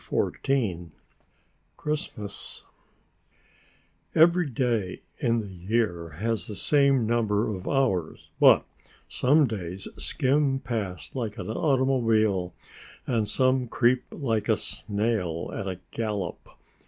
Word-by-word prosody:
CHAPTER -, -, +1 dB
XIV 95 Hz, -11 st, 0 dB, 0.9 s
CHRISTMAS 110 Hz, -9 st, -5 dB, 1.5 s
Every 170 Hz, 0 st, +5 dB
day 115 Hz, -7 st, -1 dB, 0.2 s
in 115 Hz, 0 st, +2 dB
the 110 Hz, -, -2 dB
year 95 Hz, -2 st, -1 dB
has 115 Hz, +3 st, -1 dB
the 105 Hz, -, -6 dB
same 140 Hz, -1 st, +3 dB
number 110 Hz, -2 st, +1 dB
of 90 Hz, -, -8 dB
hours, 120 Hz, -, 0 dB
but -, -, +7 dB, 0.4 s
some 145 Hz, +4 st, +3 dB
days 95 Hz, -5 st, -5 dB
skim 135 Hz, +1 st, +1 dB
past 95 Hz, -, -4 dB
like 115 Hz, -5 st, -3 dB
an -, -, -4 dB
automobile 115 Hz, -, +2 dB, 0.5 s
and 115 Hz, -4 st, 0 dB
some 130 Hz, +2 st, +2 dB
creep 125 Hz, +2 st, +2 dB
like 115 Hz, -7 st, -2 dB
a -, -, +4 dB
snail 100 Hz, -6 st, -2 dB
at 100 Hz, -, -4 dB
a 95 Hz, -1 st, -4 dB
gallop. 105 Hz, -6 st, -3 dB
115 Hz, 110 wpm, -27 LUFS, 100-130 Hz, 1.5 s, but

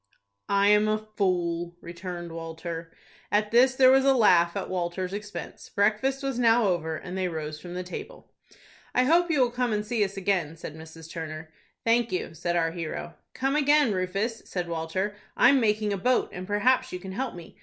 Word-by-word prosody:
"I 200 Hz, 0 st, +4 dB
am 210 Hz, +1 st, +5 dB
a 215 Hz, 0 st, +2 dB
fool," 180 Hz, -5 st, -1 dB
returned 175 Hz, 0 st, -7 dB
Walter. 165 Hz, 0 st, -6 dB, 0.4 s
At 210 Hz, 0 st, +1 dB
this 255 Hz, +3 st, +5 dB
there 260 Hz, -1 st, +7 dB
was 265 Hz, 0 st, +5 dB
a 270 Hz, 0 st, +4 dB
laugh 175 Hz, -7 st, +4 dB
at -, -, -3 dB
Walter's 180 Hz, +1 st, -3 dB
expense. 205 Hz, 0 st, -7 dB
Breakfast 220 Hz, +7 st, +1 dB
was 270 Hz, -3 st, -2 dB
now 235 Hz, -1 st, +4 dB
over, 160 Hz, -3 st, -1 dB
and 180 Hz, +3 st, -7 dB
they 190 Hz, -1 st, 0 dB
rose 155 Hz, -2 st, -5 dB
from 175 Hz, 0 st, -8 dB
the 180 Hz, -, -3 dB
table. 480 Hz, -, -9 dB, 0.6 s
"I 250 Hz, -, +5 dB
hope 340 Hz, +6 st, +3 dB
you 305 Hz, -3 st, +2 dB
will 250 Hz, -2 st, +3 dB
come 245 Hz, -1 st, -1 dB
and 210 Hz, 0 st, -1 dB
see 220 Hz, -1 st, +1 dB
us 195 Hz, 0 st, -4 dB
again," 180 Hz, -5 st, 0 dB
said 155 Hz, -2 st, -8 dB
Mrs. 160 Hz, 0 st, -11 dB
Turner. 155 Hz, -1 st, -7 dB, 0.3 s
"Thank 235 Hz, 0 st, +2 dB
you," 180 Hz, -, -3 dB
said 175 Hz, +2 st, -2 dB
our 165 Hz, -1 st, +1 dB
hero. 170 Hz, 0 st, -5 dB, 0.2 s
"Come 270 Hz, +2 st, 0 dB
again, 290 Hz, -5 st, +4 dB
Rufus," 195 Hz, +5 st, -2 dB
said 180 Hz, -2 st, -3 dB
Walter; 170 Hz, +5 st, -2 dB, 0.2 s
"I'm 265 Hz, +2 st, +6 dB
making 210 Hz, -2 st, +1 dB
a -, -, -1 dB
boat, 250 Hz, +6 st, +1 dB
and 185 Hz, +1 st, -6 dB
perhaps 255 Hz, +5 st, +2 dB
you -, -, -3 dB
can 190 Hz, +1 st, -8 dB
help 255 Hz, +4 st, -3 dB
me. 170 Hz, -1 st, -11 dB
195 Hz, 195 wpm, -27 LUFS, 170-235 Hz, 0.6 s, there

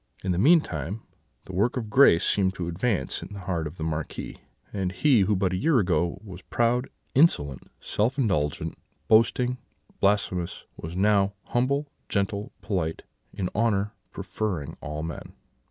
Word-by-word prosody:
In 95 Hz, -, 0 dB
the 90 Hz, -, 0 dB
meantime 105 Hz, -, +2 dB, 0.4 s
the 95 Hz, -, -9 dB
work 105 Hz, +8 st, +1 dB
of 110 Hz, -4 st, -4 dB
grace 110 Hz, -9 st, +6 dB
seemed 95 Hz, -1 st, +2 dB
to 85 Hz, -, -4 dB
advance 90 Hz, -, -1 dB
in -, -, -9 dB
the 100 Hz, -, -7 dB
heart 85 Hz, -4 st, -2 dB
of 75 Hz, +4 st, -10 dB
the 80 Hz, -, -4 dB
Marquis, 80 Hz, -1 st, -4 dB, 0.3 s
and 95 Hz, -3 st, -1 dB
he 130 Hz, +2 st, +4 dB
who 100 Hz, +2 st, +2 dB
but 95 Hz, -1 st, +1 dB
a -, -, 0 dB
year 155 Hz, -, +3 dB
ago 90 Hz, -3 st, +1 dB
was 95 Hz, -2 st, -9 dB
proud, 120 Hz, +6 st, 0 dB, 0.2 s
insolent, 75 Hz, -, +3 dB
self 115 Hz, +6 st, 0 dB
indulgent, 90 Hz, -, 0 dB, 0.3 s
boasting, 125 Hz, +3 st, +3 dB, 0.4 s
blasphemous, 95 Hz, -3 st, 0 dB
was 80 Hz, +2 st, -7 dB
now 100 Hz, 0 st, +3 dB
humble, 140 Hz, +4 st, 0 dB, 0.2 s
gentle, 100 Hz, +1 st, -1 dB
polite, 90 Hz, -6 st, -2 dB, 0.3 s
in 90 Hz, -2 st, -3 dB
honour 105 Hz, -2 st, +1 dB, 0.2 s
preferring 90 Hz, -10 st, -3 dB
all 75 Hz, +1 st, -4 dB
men. 80 Hz, -1 st, -7 dB
100 Hz, 155 wpm, -26 LUFS, 85-115 Hz, 0.4 s, grace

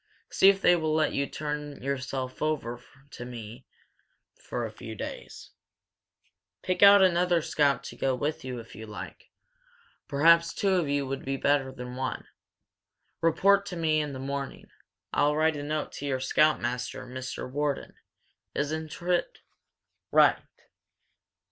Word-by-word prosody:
See 195 Hz, -, +6 dB
if 195 Hz, 0 st, +2 dB
they 175 Hz, -, +6 dB
will 155 Hz, -2 st, 0 dB
let 155 Hz, -1 st, +2 dB
you 140 Hz, 0 st, 0 dB
turn 150 Hz, -1 st, -5 dB
yourself 130 Hz, -1 st, -3 dB
over 130 Hz, -6 st, -2 dB, 0.3 s
to -, -, -8 dB
me 120 Hz, 0 st, -9 dB, 0.7 s
for 120 Hz, -1 st, -5 dB
a 110 Hz, -, -6 dB
few 110 Hz, 0 st, -9 dB
days. -, -, -8 dB, 1.1 s
Pick 185 Hz, -1 st, -1 dB
out 200 Hz, -1 st, +9 dB
another 175 Hz, -2 st, +3 dB
scout 145 Hz, -3 st, +1 dB
to -, -, -8 dB
go 130 Hz, -1 st, 0 dB
with 145 Hz, +4 st, -3 dB
you, 130 Hz, -1 st, -5 dB
if 115 Hz, -, -12 dB
you 110 Hz, +2 st, -9 dB
like. 105 Hz, -, -9 dB, 0.8 s
Perhaps 165 Hz, +3 st, +4 dB
two 195 Hz, -1 st, +1 dB
of 175 Hz, -6 st, +1 dB
you 140 Hz, -1 st, 0 dB
would 135 Hz, +1 st, -4 dB
be 135 Hz, 0 st, -2 dB
better 140 Hz, -1 st, +1 dB
than 125 Hz, -1 st, -8 dB
one. 130 Hz, 0 st, -3 dB, 1.0 s
Report 195 Hz, +5 st, +4 dB
to 180 Hz, -, -5 dB
me 155 Hz, -2 st, +1 dB
in 150 Hz, -1 st, -4 dB
the 135 Hz, -, -6 dB
morning. 140 Hz, 0 st, -5 dB, 0.4 s
I'll 145 Hz, +1 st, +3 dB
write 160 Hz, 0 st, +2 dB
a 145 Hz, -, -4 dB
note 150 Hz, +1 st, -3 dB
to 145 Hz, -, -6 dB
your 130 Hz, -2 st, 0 dB
scoutmaster 130 Hz, -3 st, +1 dB
Mr. 130 Hz, +1 st, -6 dB
Wharton, 145 Hz, +2 st, -2 dB, 0.6 s
isn't 155 Hz, +2 st, -3 dB
it? 175 Hz, 0 st, 0 dB, 0.7 s
Right!" -, -, +5 dB
145 Hz, 150 wpm, -28 LUFS, 130-160 Hz, 1.1 s, out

